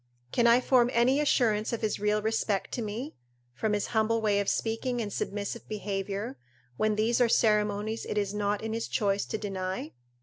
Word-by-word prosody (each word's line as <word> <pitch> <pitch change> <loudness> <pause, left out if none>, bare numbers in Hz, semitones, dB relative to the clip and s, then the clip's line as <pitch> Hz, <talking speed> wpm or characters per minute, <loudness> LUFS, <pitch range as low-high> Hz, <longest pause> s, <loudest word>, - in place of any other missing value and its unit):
Can 235 - +3
I 235 +1 +6
form 250 -2 +4
any 250 +4 +3
assurance 225 -7 +2
of 235 - -3
his 215 -2 -1
real 210 0 +1
respect 220 -2 0
to 245 - -3
me, 225 +7 -4 0.4
from 210 - -1
his 205 - 0
humble 220 +1 +2
way 210 -2 +2
of 200 - 0
speaking 240 +2 -1
and 205 -3 -3
submissive 205 +3 -4
behaviour, 195 -7 -3 0.4
when 215 +8 +1
these 225 +3 +2
are 240 - +4
ceremonies 210 0 +2
it - - -2
is 200 -1 0
not 205 0 -1
in 220 0 -3
his 230 0 -2
choice 200 -1 0
to - - -2
deny? 185 -5 -4
215 Hz, 190 wpm, -29 LUFS, 205-230 Hz, 0.4 s, I